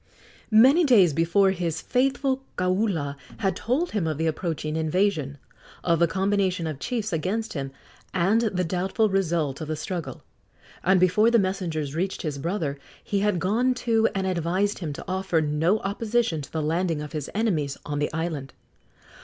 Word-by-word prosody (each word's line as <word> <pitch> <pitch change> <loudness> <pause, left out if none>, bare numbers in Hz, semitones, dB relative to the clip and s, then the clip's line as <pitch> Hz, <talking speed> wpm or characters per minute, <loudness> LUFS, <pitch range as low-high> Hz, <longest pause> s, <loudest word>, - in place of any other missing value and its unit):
Many 260 +10 +6
days 205 - +5
before 170 +5 +3
his 170 -4 -2
faithful 265 - 0 0.2
kaula 180 -6 0 0.2
had 195 -1 0
told 280 +10 -1
him 195 -7 -1
of 155 -2 -2
the 160 - -1
approaching 160 -1 -2
invasion, 160 -3 0 0.5
of 170 -2 +2
the 170 - +4
combination 190 -1 0
of 155 -4 -4
chiefs 220 - -2
against 200 +8 -2
him, 135 -3 -3 0.4
and 195 +5 +2
the 195 -6 0
doubtful 190 +6 0
result 170 -8 0
of 155 - -4
the 155 - -2
struggle; 170 +2 -5 0.6
and 190 +1 +4
before 185 +5 +4
the 235 - +4
messengers 175 -8 -1
reached 185 +4 -2
his 150 -4 -3
brother 155 -3 -2 0.2
he 200 - -1
had 205 -2 +1
gone 230 +8 +1
to 225 -2 +2
and 190 -1 0
advised 185 +3 0
him 165 -5 -4
to - - -8
offer 190 -2 0
no 155 +6 +2
opposition 210 -4 0
to 140 - -10
the 160 -1 -2
landing 165 +1 0
of 150 - -8
his 150 -4 -4
enemies 165 -11 0
on 145 0 -3
the 150 - -1
island. 155 -5 -3
180 Hz, 170 wpm, -25 LUFS, 160-205 Hz, 0.6 s, Many